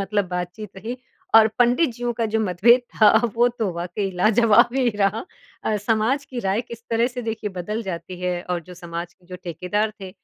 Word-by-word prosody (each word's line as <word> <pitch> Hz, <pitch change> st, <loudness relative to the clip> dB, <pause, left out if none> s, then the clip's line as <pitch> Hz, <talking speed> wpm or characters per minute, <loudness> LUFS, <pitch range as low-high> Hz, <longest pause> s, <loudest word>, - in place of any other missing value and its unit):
मतलब 195 Hz, -1 st, -1 dB
बातचीत 180 Hz, +3 st, -5 dB
रही 225 Hz, +6 st, -5 dB, 0.4 s
और 220 Hz, -1 st, +8 dB
पंडित 245 Hz, +5 st, +3 dB
जीयों 240 Hz, 0 st, -2 dB
का 230 Hz, 0 st, -2 dB
जो 220 Hz, +1 st, 0 dB
मतभेद 215 Hz, +6 st, +4 dB
था, 215 Hz, -2 st, +6 dB, 0.3 s
वो 240 Hz, +1 st, +5 dB
तो 230 Hz, -4 st, -2 dB
वाक़ई 175 Hz, +3 st, -3 dB
लाजवाब 215 Hz, +3 st, +5 dB
ही 260 Hz, -2 st, +3 dB
रहा। 205 Hz, +2 st, +1 dB, 0.4 s
अ, 215 Hz, -, +1 dB
समाज 225 Hz, +6 st, 0 dB
की 255 Hz, -3 st, -7 dB
राय 195 Hz, +2 st, 0 dB
किस 235 Hz, -1 st, -10 dB
तरह 230 Hz, +1 st, +2 dB
से, 250 Hz, -1 st, -5 dB
देखिए, 225 Hz, -2 st, -3 dB
बदल 195 Hz, +5 st, -4 dB
जाती 180 Hz, -2 st, -6 dB
है 180 Hz, -1 st, -1 dB
और 175 Hz, -1 st, 0 dB
जो 180 Hz, +2 st, -12 dB
समाज 170 Hz, 0 st, -6 dB
के 180 Hz, -, -28 dB
जो 180 Hz, 0 st, -8 dB
ठेकेदार 185 Hz, +6 st, -1 dB
थे, 190 Hz, -1 st, -7 dB
210 Hz, 200 wpm, -23 LUFS, 180-230 Hz, 0.4 s, और